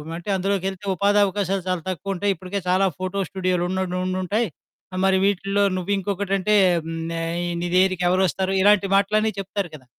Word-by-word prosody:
అంటే 175 Hz, +4 st, -7 dB
"అందులోకెళ్తే 195 Hz, +1 st, -2 dB
ఉపాధి 200 Hz, +3 st, +2 dB
అవకాశాలు 195 Hz, -1 st, -1 dB
చాలా 180 Hz, -2 st, -1 dB
తక్కువుంటాయి, 195 Hz, +3 st, -1 dB
ఇప్పటికే 185 Hz, +3 st, -5 dB
చాలా 185 Hz, +2 st, +3 dB
ఫోటో 185 Hz, +1 st, -3 dB
స్టూడియోలు 185 Hz, -2 st, -1 dB
ఉండ్ 185 Hz, -1 st, -2 dB
ఉండుంటాయి 185 Hz, +5 st, -1 dB, 0.6 s
మరి 190 Hz, 0 st, +4 dB
వీటిల్లో 200 Hz, 0 st, +1 dB
నువ్వింకొకటంటే 195 Hz, +1 st, -1 dB, 0.3 s
హ్మ్. 165 Hz, 0 st, -5 dB, 0.2 s
ఆహ్, 165 Hz, +1 st, -2 dB, 0.2 s
నీ 175 Hz, -, -1 dB
దగ్గరికెవరొస్తారు?" 185 Hz, 0 st, +2 dB
ఇలాంటి 205 Hz, 0 st, +4 dB
మాటలన్నీ 215 Hz, +2 st, +2 dB
చెప్తారు 195 Hz, -1 st, -3 dB
కదా! 130 Hz, -4 st, -14 dB
190 Hz, 140 wpm, -23 LUFS, 185-200 Hz, 0.6 s, మరి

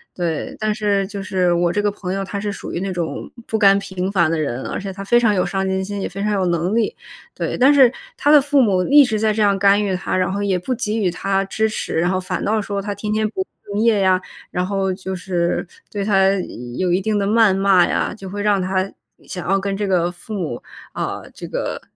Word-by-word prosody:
对。 170 Hz, -4 st, -3 dB
但 215 Hz, -1 st, 0 dB
是 205 Hz, -2 st, 0 dB
就 200 Hz, 0 st, -6 dB
是， 185 Hz, -2 st, +1 dB
我 175 Hz, 0 st, +2 dB
这 205 Hz, +3 st, -1 dB
个 205 Hz, -, +2 dB
朋 190 Hz, -2 st, -5 dB
友 195 Hz, 0 st, -2 dB
他 200 Hz, +1 st, -4 dB
是 205 Hz, +1 st, -3 dB
属 195 Hz, -, -7 dB
于 -, -, -3 dB
那 195 Hz, +1 st, -3 dB
种 170 Hz, -2 st, -4 dB, 0.2 s
不 220 Hz, -, -2 dB
甘 195 Hz, -2 st, +6 dB
平 190 Hz, -2 st, -3 dB
凡 170 Hz, -5 st, +2 dB
的 165 Hz, -, 0 dB
人， 130 Hz, -4 st, -2 dB
而 -, -, -3 dB
且 195 Hz, -1 st, -5 dB
他 195 Hz, -, -7 dB
非 240 Hz, +4 st, +4 dB
常 220 Hz, -4 st, +3 dB
有 180 Hz, -, +1 dB
上 195 Hz, -1 st, -1 dB
进 190 Hz, 0 st, 0 dB
心， 200 Hz, +1 st, -5 dB
也 -, -, -2 dB
非 195 Hz, +2 st, -5 dB
常 210 Hz, -, 0 dB
有 195 Hz, -2 st, +1 dB
能 175 Hz, +3 st, 0 dB
力。 235 Hz, -, +1 dB, 0.4 s
对， -, -, -3 dB
但 270 Hz, +3 st, +6 dB
是 265 Hz, -4 st, +6 dB, 0.2 s
他 290 Hz, -, +2 dB
的 295 Hz, -, +8 dB
父 280 Hz, 0 st, +3 dB
母 195 Hz, -6 st, +3 dB
一 290 Hz, +1 st, +8 dB
直 220 Hz, -5 st, -1 dB
在 215 Hz, 0 st, +2 dB
这 215 Hz, -, -1 dB
样 200 Hz, -2 st, +3 dB
干 200 Hz, +1 st, +4 dB
预 195 Hz, -2 st, -1 dB
他， -, -, -3 dB
然 185 Hz, 0 st, +1 dB
后 200 Hz, -, -2 dB
也 195 Hz, -2 st, +1 dB
不 215 Hz, +9 st, -3 dB
给 220 Hz, -2 st, -2 dB
予 190 Hz, -5 st, +1 dB
他 195 Hz, +2 st, 0 dB
支 220 Hz, +3 st, 0 dB
持， 215 Hz, -, -4 dB
然 175 Hz, -, +2 dB
后 185 Hz, 0 st, 0 dB
反 180 Hz, -, -3 dB
倒 215 Hz, +1 st, +1 dB
说 200 Hz, -1 st, -3 dB
他 205 Hz, 0 st, -4 dB
天 210 Hz, +1 st, -4 dB
天 215 Hz, 0 st, +1 dB
不 380 Hz, -, -3 dB, 0.3 s
敬 210 Hz, -, 0 dB
业 225 Hz, -3 st, +4 dB
呀， 185 Hz, -1 st, +3 dB, 0.3 s
然 180 Hz, 0 st, -1 dB
后 195 Hz, -1 st, -1 dB
就 190 Hz, 0 st, -6 dB
是 180 Hz, -1 st, -1 dB, 0.2 s
对 200 Hz, -1 st, -3 dB
他 195 Hz, -2 st, +4 dB, 0.5 s
有 185 Hz, -, 0 dB
一 180 Hz, +2 st, +2 dB
定 210 Hz, +1 st, 0 dB
的 200 Hz, -, 0 dB
谩 220 Hz, -1 st, +4 dB
骂 195 Hz, -2 st, +4 dB
呀， -, -, -1 dB
就 195 Hz, -2 st, -8 dB
会 205 Hz, -, -6 dB
有 205 Hz, -, -2 dB
让 205 Hz, -2 st, +2 dB
他 185 Hz, +1 st, -1 dB, 0.4 s
想 180 Hz, -, -6 dB
要 195 Hz, -, +3 dB
跟 195 Hz, 0 st, -2 dB
这 205 Hz, -, -1 dB
个 175 Hz, -2 st, +2 dB
父 175 Hz, +5 st, -10 dB
母， 165 Hz, -, -3 dB, 0.3 s
啊， -, -, -3 dB
这 -, -, -9 dB
个 -, -, -3 dB
195 Hz, 275 characters per minute, -20 LUFS, 185-210 Hz, 0.5 s, 的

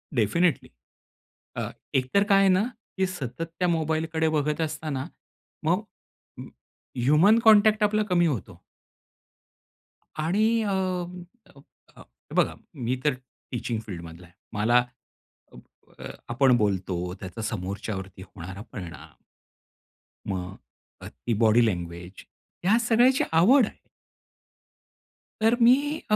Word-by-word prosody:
Definitely 140 Hz, -, +1 dB, 0.9 s
a, -, -, -2 dB, 0.3 s
एकतर 130 Hz, +10 st, +2 dB
काय 195 Hz, -1 st, +6 dB
आहे 195 Hz, -1 st, +5 dB
ना 185 Hz, +1 st, +4 dB, 0.4 s
की 190 Hz, -, +2 dB
सतत 145 Hz, -5 st, -5 dB, 0.2 s
त्या 180 Hz, -, +2 dB
मोबाईलकडे 160 Hz, -1 st, 0 dB
बघत 150 Hz, 0 st, 0 dB
असता 155 Hz, 0 st, -3 dB
ना, 135 Hz, -2 st, -3 dB, 0.6 s
मग -, -, +2 dB, 0.6 s
अ, -, -, -6 dB, 0.6 s
ह्यूमन 165 Hz, -, +5 dB
कॉन्टॅक्ट 215 Hz, 0 st, +6 dB
आपला 215 Hz, +1 st, +2 dB
कमी 175 Hz, -1 st, +3 dB
होतो. 100 Hz, -, -4 dB, 1.6 s
आणि 205 Hz, +7 st, +2 dB, 0.2 s
अ, 205 Hz, -, -1 dB
अ, 180 Hz, -, -5 dB, 0.4 s
अ, -, -, -14 dB
हे -, -, -15 dB
बघा, -, -, +2 dB, 0.2 s
मी 125 Hz, +1 st, -2 dB
तर 150 Hz, -, +3 dB, 0.4 s
टीचिंग 120 Hz, -2 st, -3 dB
फील्डमधला 85 Hz, -2 st, -9 dB
आहे. 85 Hz, -, -25 dB, 0.2 s
मला 120 Hz, +4 st, +3 dB, 1.2 s
अ, -, -, -9 dB, 0.3 s
आपण 130 Hz, +1 st, +4 dB
बोलतो 95 Hz, -4 st, -1 dB
त्याचा 95 Hz, +3 st, -7 dB
समोरच्यावरती 95 Hz, -1 st, -5 dB
होणारा 95 Hz, +1 st, -9 dB
परिणाम, 85 Hz, -6 st, -9 dB, 1.2 s
मग 90 Hz, 0 st, -5 dB, 0.5 s
अ, -, -, -8 dB
ती 115 Hz, -, -4 dB
बॉडी 115 Hz, +2 st, +5 dB
लँग्वेज, 90 Hz, -1 st, -5 dB, 0.4 s
ह्या 205 Hz, +5 st, +4 dB
सगळ्याची 245 Hz, +3 st, +3 dB
आवड 220 Hz, -, +5 dB
आहे. -, -, -12 dB, 1.6 s
तर 225 Hz, +2 st, +4 dB
मी 240 Hz, +2 st, +8 dB, 0.4 s
अ -, -, +6 dB
145 Hz, 115 wpm, -26 LUFS, -, 1.6 s, मी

